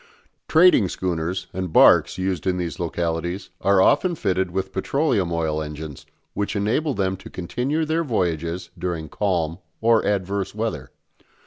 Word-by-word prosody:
Trading 160 Hz, -, +5 dB
schooners 90 Hz, +1 st, -2 dB
and 90 Hz, -2 st, -3 dB
barques -, -, +6 dB
used 95 Hz, -2 st, -2 dB
in 90 Hz, -1 st, +1 dB
these 85 Hz, -5 st, -4 dB
localities 85 Hz, +2 st, -3 dB
are 100 Hz, +1 st, +4 dB
often 155 Hz, -, +3 dB
fitted 95 Hz, -, 0 dB
with 95 Hz, +2 st, -3 dB
petroleum 100 Hz, -, 0 dB
oil 80 Hz, -2 st, -1 dB
engines, 75 Hz, -1 st, -7 dB, 0.3 s
which 100 Hz, +1 st, -2 dB
enable 120 Hz, +8 st, 0 dB
them 95 Hz, -1 st, 0 dB
to -, -, -12 dB
continue 125 Hz, -, -2 dB
their 160 Hz, +2 st, 0 dB
voyages 85 Hz, -, -2 dB
during 85 Hz, -3 st, -4 dB
calm 85 Hz, -4 st, -1 dB, 0.2 s
or 115 Hz, 0 st, +3 dB
adverse 100 Hz, 0 st, -1 dB
weather. 110 Hz, +1 st, -3 dB
95 Hz, 140 wpm, -23 LUFS, 85-105 Hz, 0.3 s, barques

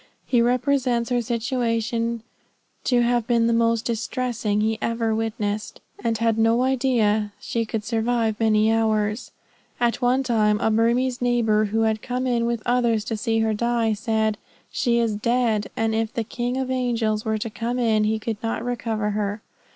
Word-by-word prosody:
He 240 Hz, -2 st, +2 dB
represents 250 Hz, 0 st, +1 dB
her 245 Hz, -1 st, +2 dB
situation 230 Hz, -1 st, -1 dB, 0.6 s
to 245 Hz, -2 st, +3 dB
have 240 Hz, -1 st, +1 dB
been 235 Hz, -2 st, +3 dB
the 235 Hz, -, +2 dB
most 230 Hz, 0 st, +2 dB
distressing 230 Hz, -2 st, -1 dB
he 220 Hz, +1 st, 0 dB
ever 230 Hz, -1 st, 0 dB
witnessed, 215 Hz, -1 st, -3 dB, 0.2 s
and 230 Hz, -1 st, 0 dB
he 230 Hz, -, -1 dB
had 225 Hz, -1 st, +2 dB
no 225 Hz, +2 st, +3 dB
idea 235 Hz, -6 st, +1 dB
she 230 Hz, -1 st, -2 dB
could 215 Hz, 0 st, -3 dB
survive 225 Hz, -1 st, 0 dB
many 220 Hz, 0 st, +3 dB
hours. 220 Hz, 0 st, 0 dB, 0.5 s
At 240 Hz, +1 st, +1 dB
one 250 Hz, +2 st, +2 dB
time 215 Hz, -4 st, +2 dB
a 220 Hz, -, +1 dB
Burmese 245 Hz, +3 st, +1 dB
neighbor, 230 Hz, -3 st, +2 dB
who 220 Hz, +2 st, 0 dB
had 220 Hz, -1 st, +1 dB
come 250 Hz, +1 st, -3 dB
in 235 Hz, -2 st, +1 dB
with 235 Hz, -2 st, -2 dB
others 235 Hz, -3 st, +1 dB
to 225 Hz, -, -2 dB
see 225 Hz, +1 st, 0 dB
her 220 Hz, 0 st, +1 dB
die, 235 Hz, 0 st, +1 dB
said 220 Hz, 0 st, -1 dB, 0.3 s
"She 235 Hz, -2 st, +1 dB
is 230 Hz, -2 st, +1 dB
dead; 230 Hz, -2 st, 0 dB
and 225 Hz, 0 st, +1 dB
if 225 Hz, 0 st, -1 dB
the 230 Hz, -, -2 dB
King 240 Hz, +2 st, -3 dB
of 260 Hz, -1 st, -2 dB
angels 230 Hz, -4 st, 0 dB
were 220 Hz, -1 st, -1 dB
to 220 Hz, +1 st, -4 dB
come 235 Hz, +3 st, -3 dB
in, 220 Hz, -3 st, +2 dB
he 220 Hz, +1 st, +1 dB
could 220 Hz, 0 st, -4 dB
not 225 Hz, 0 st, -3 dB
recover 225 Hz, -3 st, -2 dB
her." 205 Hz, 0 st, -3 dB
230 Hz, 175 wpm, -23 LUFS, 220-240 Hz, 0.6 s, to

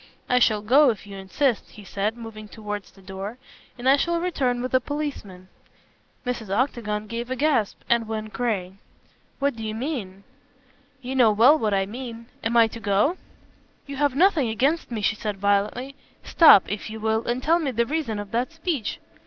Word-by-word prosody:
"I 250 Hz, -, +3 dB
shall 215 Hz, -3 st, +2 dB
go 270 Hz, +6 st, +5 dB
if 215 Hz, -3 st, -3 dB
you 200 Hz, -1 st, -10 dB
insist," 210 Hz, +6 st, -1 dB
he 210 Hz, -, -13 dB
said, 205 Hz, +3 st, -2 dB
moving 220 Hz, -2 st, -9 dB
towards 210 Hz, -2 st, -6 dB
the 195 Hz, -, -20 dB
door, 195 Hz, +4 st, -7 dB, 0.4 s
"and 245 Hz, +1 st, -4 dB
I 275 Hz, +1 st, +6 dB
shall 340 Hz, +3 st, 0 dB
return 260 Hz, -9 st, -1 dB
with 255 Hz, -, -4 dB
a 255 Hz, -, +5 dB
policeman." 250 Hz, -11 st, -5 dB, 0.8 s
Mrs. 240 Hz, -4 st, -3 dB
Octagon 215 Hz, -2 st, -1 dB
gave 235 Hz, +3 st, -5 dB
a 260 Hz, -, -1 dB
gasp 270 Hz, -7 st, +1 dB
and 235 Hz, -1 st, +2 dB
went 215 Hz, -1 st, -5 dB
gray. 200 Hz, -6 st, -2 dB, 0.6 s
"What 280 Hz, -2 st, 0 dB
do 225 Hz, -, -8 dB
you 215 Hz, 0 st, -4 dB
mean?" 220 Hz, -7 st, -5 dB, 0.8 s
"You 255 Hz, +2 st, -4 dB
know 245 Hz, -4 st, +5 dB
well 235 Hz, +8 st, +6 dB
what 215 Hz, -9 st, 0 dB
I 195 Hz, 0 st, +1 dB
mean. 230 Hz, +1 st, -8 dB, 0.2 s
Am 235 Hz, +1 st, +1 dB
I 230 Hz, -, +7 dB
to 230 Hz, -, -9 dB
go?" 210 Hz, -, +1 dB, 0.7 s
"You 280 Hz, -1 st, -7 dB
have 285 Hz, -2 st, +1 dB
nothing 320 Hz, -, +3 dB
against 275 Hz, +9 st, 0 dB
me," 230 Hz, -3 st, -4 dB
she 225 Hz, -, +2 dB
said 210 Hz, -2 st, -4 dB
violently, 205 Hz, +7 st, 0 dB, 0.3 s
"stop, 310 Hz, -, +7 dB
if 205 Hz, +2 st, -4 dB
you 220 Hz, 0 st, -7 dB
will, 220 Hz, +1 st, -1 dB
and 245 Hz, +2 st, -1 dB
tell 335 Hz, +3 st, +3 dB
me 305 Hz, -5 st, -1 dB
the 235 Hz, -2 st, 0 dB
reason 280 Hz, -6 st, -2 dB
of 205 Hz, -1 st, -6 dB
that 245 Hz, +6 st, -1 dB
speech." 325 Hz, -, -3 dB
230 Hz, 190 wpm, -24 LUFS, 210-265 Hz, 0.8 s, I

